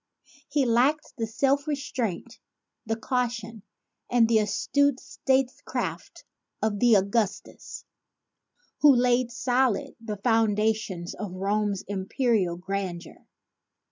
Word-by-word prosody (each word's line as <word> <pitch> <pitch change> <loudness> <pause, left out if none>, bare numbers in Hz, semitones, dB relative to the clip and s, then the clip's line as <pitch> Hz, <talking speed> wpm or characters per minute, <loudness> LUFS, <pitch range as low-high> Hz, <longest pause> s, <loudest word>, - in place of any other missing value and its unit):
He 285 -3 +1
lacked 255 +7 +2
the 225 - -1
self 275 +5 +1
restraint, 260 - -3 0.5
the 225 - 0
caution 230 -2 -3 0.5
and 240 -2 +4
the 225 -1 +4
astute 260 +6 +1
statecraft 265 -1 -2 0.3
of 210 -2 -1
the 235 -2 +6
Au 190 - +3
gustus 205 0 -3 0.9
who 290 -3 +7
laid 245 0 +2
solid 250 -1 0
the 215 -2 -5
foundations 215 -4 0
of 205 -4 -6
Rome's 200 +1 -1
imperial 200 -2 0
grandeur. 180 -2 -5
225 Hz, 105 wpm, -26 LUFS, 205-250 Hz, 0.9 s, who